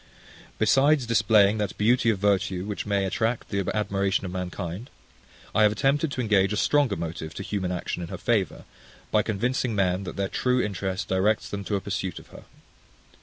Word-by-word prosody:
Besides 140 0 +3
displaying 110 -2 +4
that 105 -2 -3
beauty 115 +2 +3
of 110 - +2
virtue 95 -2 0
which 105 0 -4
may 100 -1 +1
attract 110 +5 -1
the 100 -2 -1
admiration 100 -2 0
of 90 - -5
mankind, 90 +3 -5 0.6
I 110 - +3
have 105 -1 +6
attempted 140 +7 +1
to 130 - -2
engage 100 -4 +2
a 105 - -1
stronger 140 -6 +2
motive 80 -2 -5
to - - -5
human 95 -3 -2
action 90 0 -3
in 85 - -5
her - - -5
favour, 110 -7 0 0.5
by 105 - +4
convincing 115 +2 -1
men, 95 -1 +1
that - - -6
their 100 0 -1
true 125 +5 0
interest 95 -3 -2
directs 100 +3 +1
them 100 0 -4
to 105 - -1
a 100 - -1
pursuit 95 -2 -3
of - - -12
her. - - -13
100 Hz, 185 wpm, -26 LUFS, 95-115 Hz, 0.6 s, have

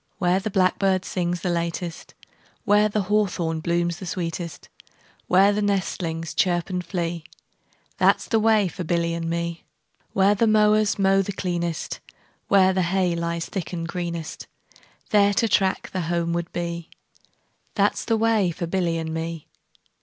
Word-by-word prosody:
Where 180 0 +2
the 210 +3 -3
blackbird 190 -1 +2
sings 175 -1 -2
the 180 - -1
latest, 170 0 -4
5 - - -25 0.3
Where 210 +1 +4
the 210 -1 0
hawthorn 180 -5 0
blooms 170 +1 0
the 185 - -7
sweetest, 170 -4 -4 0.6
Where 195 +3 +5
the 210 - 0
nestlings 180 -5 -2
chirp 175 0 +1
and 180 -1 -2
flee, 170 -2 -3 0.8
That - - +5
's - - -8
the 225 - +1
way 215 -2 +4
for 180 +1 -6
Billy 170 0 0
and 165 0 -3
me. 170 0 -3 0.5
Where 195 +1 +4
the 225 +3 +2
mowers 215 -1 +3
mow 195 0 +4
the 195 - -3
cleanest, 175 -3 -3 0.5
Where 190 -1 +5
the 185 - +1
hay 180 0 +1
lies 170 0 -2
thick 185 -2 -5
and 165 -1 -3
greenest, 170 -3 -5 0.2
10 - - -24 0.3
There 205 -1 +5
to 230 - +2
track 190 -2 +1
the 185 - -2
homeward 170 0 -1
bee, 170 -1 -4 0.9
That - - +3
's - - -4
the 225 - +1
way 220 -4 +2
for 170 +1 -4
Billy 170 -1 0
and 160 -1 -4
me. 165 -1 -4
180 Hz, 165 wpm, -24 LUFS, 170-195 Hz, 0.9 s, Where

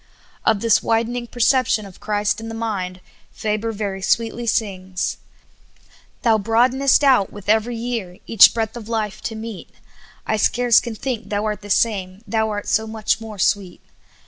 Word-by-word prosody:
Of 215 -3 +3
this 225 -1 +3
widening 235 +2 -1
perception 240 -2 +2
of 190 -2 -13
Christ 210 0 -1
in 225 - -6
the 225 - -6
mind, 190 -5 -4 0.3
Faber 215 +1 -2
very 200 -3 -4
sweetly 230 +3 0
sings: 190 -5 -2 0.4
' - - -33
' - - -30
Thou 225 -2 +4
broadenest 250 +6 +3
out 260 -8 +4
with 205 -2 -11
every 220 +3 +2
year, 225 -7 -4
Each 225 - +7
breadth 225 -1 -3
of 230 -2 -8
life 215 -3 -2
to 225 - -4
meet, 220 -3 -7 0.6
I 220 - 0
scarce 240 +2 +4
can 235 -2 -6
think 230 -3 -4
Thou 205 +1 -1
art 210 -1 -2
the 205 - -11
same, 195 -2 0
Thou 220 -1 0
art 205 -1 -4
so 220 +1 +1
much 220 0 -1
more 220 -2 -8
sweet. 190 -1 0
220 Hz, 170 wpm, -21 LUFS, 205-230 Hz, 0.6 s, Each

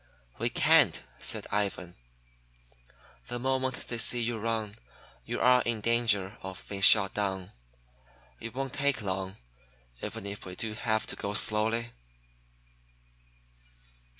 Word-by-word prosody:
"We - - 0
can't," - - +4 0.2
said - - -1
Ivan. 100 -4 -1 1.3
"The 120 - -3
moment 130 0 -1
they 120 - -3
see 120 +1 +1
you 115 -1 -1
run, 110 -1 -2 0.5
you - - -3
are 125 0 +5
in 115 -2 -1
danger 110 -3 +1
of 95 -1 -8
being 100 -1 -5
shot 100 -1 +7
down. 95 -2 -2 0.9
It 115 +1 -7
won't 135 0 -3
take 140 -5 0
long, 95 0 -3 0.7
even - - -5
if 100 0 -6
we 90 - -7
do 110 +1 -2
have 110 0 0
to - - -3
go 100 +1 -4
slowly." 110 +3 +2
110 Hz, 125 wpm, -29 LUFS, 100-120 Hz, 1.3 s, shot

